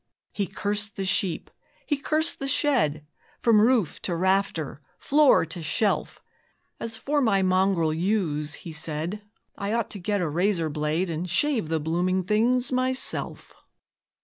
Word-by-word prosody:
He 200 -2 -2
cursed 205 +1 -3
the 195 - -3
sheep, 185 -3 0 0.3
he 295 - +1
cursed 310 +3 0
the 275 - -3
shed, 235 - +1 0.4
From 225 -3 +5
roof 230 - +2
to 175 - -2
rafter, 180 -5 0 0.2
floor 290 - +4
to 165 +1 -7
shelf; 180 +7 -1 0.6
As 225 -1 -5
for 290 +5 0
my 200 -6 +3
mongrel 185 -3 +2
ewes, 160 -4 -1
he 170 - -9
said, 160 +5 -3 0.3
I 200 +1 -3
ought 230 -3 -1
to 205 - -6
get 205 +3 -1
a 175 - 0
razor 170 0 0
blade 155 +4 -1
And 165 +3 -4
shave 235 - +1
the 160 -1 0
blooming 175 +4 0
things 235 +6 +2
myself. 255 +1 -2
195 Hz, 150 wpm, -26 LUFS, 165-225 Hz, 0.6 s, From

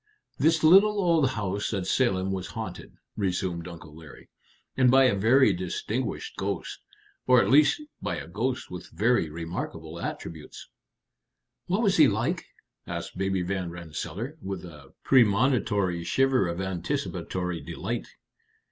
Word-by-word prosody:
"This 160 +2 +3
little 200 +6 +6
old 165 -7 +3
house 105 -4 -2
at 95 -2 -2
Salem 95 -4 +1
was 95 -2 -3
haunted," - - -7 0.2
resumed 90 -3 -2
Uncle 80 -3 -11
Larry. 80 -3 -14 0.4
"And 130 -1 +4
by 135 +2 +6
a 130 - +4
very 110 +3 +4
distinguished 100 +7 -4
ghost - - -3 0.5
or 125 -1 +6
at - - +2
least 150 - +5 0.2
by - - -2
a - - -7
ghost 120 +8 -3
with 90 -1 -8
very 115 -6 +1
remarkable 80 0 -6
attributes." 80 -2 -7 1.0
"What 195 +6 +1
was 195 -2 +3
he 155 -3 +8
like?" - - -1 0.4
asked - - -5
Baby 95 -1 -1
Van 90 -1 -2
Rensselaer, 85 - -6
with 95 -2 -5
a 75 -5 -13
premonitory 105 -7 +3
shiver 135 -1 +2
of 85 +1 -4
anticipatory 90 -1 -3
delight. - - -4
95 Hz, 135 wpm, -27 LUFS, 85-130 Hz, 1.0 s, he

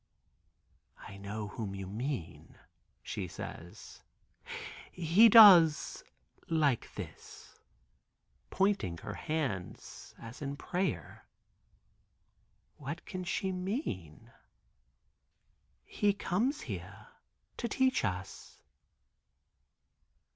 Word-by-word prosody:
"I 100 - -11
know 105 +1 -5
whom 100 -1 -5
you 95 0 -5
mean," 105 - -5 0.5
she 90 - -4
says. 85 0 -9 0.9
"He 180 +7 +5
does 180 -9 +8 0.5
like 150 -7 +1
this," - - -10 0.9
pointing 195 - 0
her - - -7
hands 135 - -4
as 115 +4 -11
in 140 -1 -3
prayer. 185 +5 -3 1.5
What - - -6
can 185 -2 -5
she 190 +1 -2
mean? 190 - -4 1.5
"He 205 -2 +1
comes 220 - -1
here - - -8 0.5
to 240 - -2
teach 260 +3 +2
us." 95 -2 -5
155 Hz, 80 wpm, -32 LUFS, -, 1.5 s, does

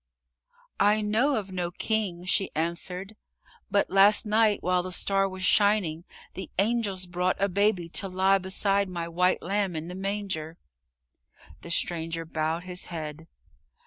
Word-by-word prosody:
"I 210 +1 +4
know 225 +7 +1
of 200 -4 -4
no 180 -2 -2
king," 185 -2 -2
she 195 +1 +2
answered, 180 +5 -3 0.5
"but 200 - +1
last 200 +3 +6
night 215 0 +2
while 180 0 +2
the 185 +1 -6
star 195 +1 +2
was 185 0 -7
shining, 190 -5 +3 0.3
the 190 - -7
angels 200 -2 0
brought 180 +1 -1
a 200 - +2
baby 200 -2 +1
to 195 - -3
lie 190 +1 +2
beside 195 +1 0
my 170 -2 -4
white 180 +2 +1
lamb 195 -1 -1
in 160 +2 -5
the - - -6
manger." 190 -4 -4 1.0
The - - -10
stranger 165 -1 -1
bowed 160 +1 -2
his 180 0 -6
head. 160 -1 -6
185 Hz, 145 wpm, -27 LUFS, 175-200 Hz, 1.0 s, last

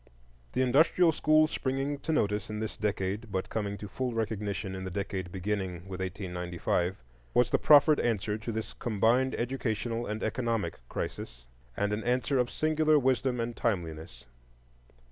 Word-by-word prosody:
The 130 - +2
industrial 160 +6 +4
school 155 0 +4
springing 135 -1 -2
to 160 - -3
notice 105 -9 0
in 105 - -4
this 110 0 -3
decade, 105 +1 -2
but 95 - -2
coming 100 -2 -2
to 105 - -7
full 125 +4 -3
recognition 105 -3 -2
in 95 0 -5
the 95 - -4
decade 95 -1 -4
beginning 95 -2 -3
with 95 -1 -6
1895, 90 -1 -2 0.4
was 125 -1 +4
the - - +3
proffered 150 0 +6
answer 105 -3 0
to 110 +2 -4
this 110 0 -4
combined 120 +3 +2
educational 120 -2 -2
and 105 +1 -3
economic 115 -1 -1
crisis, 60 -1 -5 0.3
and 100 0 +1
an 105 - -2
answer 125 +2 +1
of 125 -1 +1
singular 155 0 +3
wisdom 130 -2 +1
and 115 0 -2
timeliness. 80 - -3
110 Hz, 155 wpm, -30 LUFS, 95-130 Hz, 0.4 s, proffered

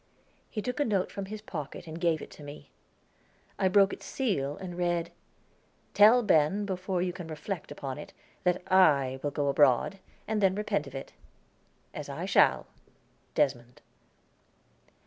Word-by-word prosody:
He 215 - -4
took 250 +2 -3
a - - +4
note 200 -7 0
from 200 - -5
his 215 +2 -8
pocket 155 -4 -6
and 160 0 -8
gave 165 -3 +1
it - - -11
to - - -13
me. 145 +1 -11 0.9
I 190 - +3
broke 195 +1 +4
its - - -9
seal, 150 - -1
and 180 -2 -7
read: 175 -1 -1 0.8
"Tell 225 +4 +7
Ben, 190 +1 +3
before 185 -1 -2
you 180 -1 -2
can 175 -2 -8
reflect 160 +3 -5
upon 135 0 -5
it, - - -9 0.3
that 180 0 +1
I 140 -8 +4
will 145 - -1
go 145 0 -2
abroad, 140 +6 +3 0.3
and 215 -1 0
then 190 -1 +3
repent 200 -8 -1
of 135 - -10
it, 135 - -7 0.8
as - - -7
I - - -4
shall. - - +4 0.7
Desmond." 125 -3 -1
175 Hz, 160 wpm, -29 LUFS, 145-195 Hz, 0.9 s, Tell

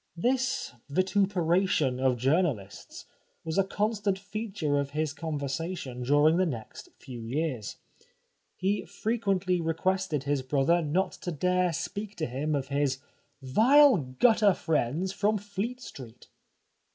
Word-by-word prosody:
This 260 - 0 0.2
vituperation 185 -5 +1
of 130 -2 +2
journalists 135 - -1 0.4
was 160 +3 -1
a - - +5
constant 205 0 -1
feature 200 -7 -2
of 140 -1 -2
his 155 -2 0
conversation 150 -3 -4
during 145 +5 +4
the 185 - +3
next 115 -8 -7
few 125 -3 -9
years. 125 -2 -3 0.8
He 195 +2 0
frequently 195 -5 -1
requested 165 -1 -1
his 140 -1 0
brother 140 +6 +2
not 165 +5 0
to 175 - -3
dare 180 +3 +1
speak 200 +6 -5
to 160 - -2
him 145 +4 -2
of 135 -1 -3
his 140 -2 0 0.3
'' - - -44
vile 255 - +6
gutter 195 - +3
friends 160 +4 -1
from 210 +2 +1
Fleet 205 +5 -4
Street." 125 - -11
165 Hz, 125 wpm, -28 LUFS, 140-195 Hz, 0.8 s, vile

